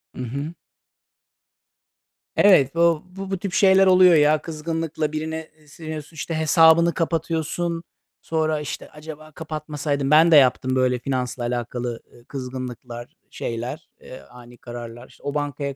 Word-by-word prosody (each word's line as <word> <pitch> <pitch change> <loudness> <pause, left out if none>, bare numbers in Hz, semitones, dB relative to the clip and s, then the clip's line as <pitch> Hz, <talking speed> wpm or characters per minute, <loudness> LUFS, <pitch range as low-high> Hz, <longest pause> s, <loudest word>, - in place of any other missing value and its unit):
Hı - - -6
hı. 140 +7 -5 1.8
Evet, 165 -8 +5
bu 170 -2 +3
bu 195 +1 -9
bu 195 - 0
tip 195 -2 -5
şeyler 190 -1 +5
oluyor 185 -2 +7
ya. 150 0 +4
Kızgınlıkla 160 -1 -3
birine, 160 +1 -4
eee, 150 - -24
sinirleniyorsun, 155 0 -8
işte, 160 +2 -4
hesabını 160 +2 +5
kapatıyorsun. 165 0 -2 0.4
Sonra, 155 -1 -1
işte, 150 - -6
"Acaba 155 0 -11
kapatmasaydım." 150 -2 -3
Ben 160 +2 +6
de - - +7
yaptım 130 -1 +4
böyle 125 -1 +1
finansla 125 -1 -3
alakalı, 120 0 -3
eee, 120 - -18
kızgınlıklar, 125 -2 -7 0.2
şeyler, 120 +7 -5
eee, 130 - -11
ani 120 0 -15
kararlar. 120 0 -9
İşte, - - -21
o 145 0 -3
bankaya 145 -1 -3
150 Hz, 135 wpm, -23 LUFS, 130-165 Hz, 1.8 s, oluyor